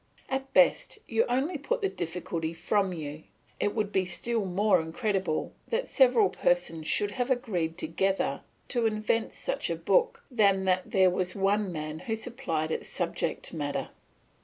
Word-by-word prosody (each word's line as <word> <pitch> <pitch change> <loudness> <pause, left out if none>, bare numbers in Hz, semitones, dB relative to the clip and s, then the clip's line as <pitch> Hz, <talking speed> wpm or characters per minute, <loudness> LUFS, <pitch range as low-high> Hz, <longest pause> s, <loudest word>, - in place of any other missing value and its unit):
At 270 0 -2
best, 275 +9 +3
you 225 -1 +2
only 275 +7 0
put 475 - -2
the - - +4
difficulty 165 - -3
from 190 +3 +1
you; 155 -2 -6 0.3
it 205 - 0
would 210 -2 0
be 190 - +2
still 205 +5 -1
more 195 +1 +3
incredible 180 +1 -1
that 480 +2 -1
several 245 -7 +5
persons 165 -3 0
should 205 0 +1
have 245 +3 -2
agreed 190 -11 -1
together 190 +4 0 0.3
to 240 -3 +2
invent 215 +1 0
such - - -2
a - - 0
book, 475 -1 +1
than 200 -5 +3
that 185 0 +1
there 190 -2 +4
was 180 0 -1
one 200 0 +1
man 155 -1 -5
who 225 - -2
supplied 220 -10 -3
its - - -2
subject - - -2
matter. - - -3
200 Hz, 160 wpm, -29 LUFS, 175-245 Hz, 0.3 s, several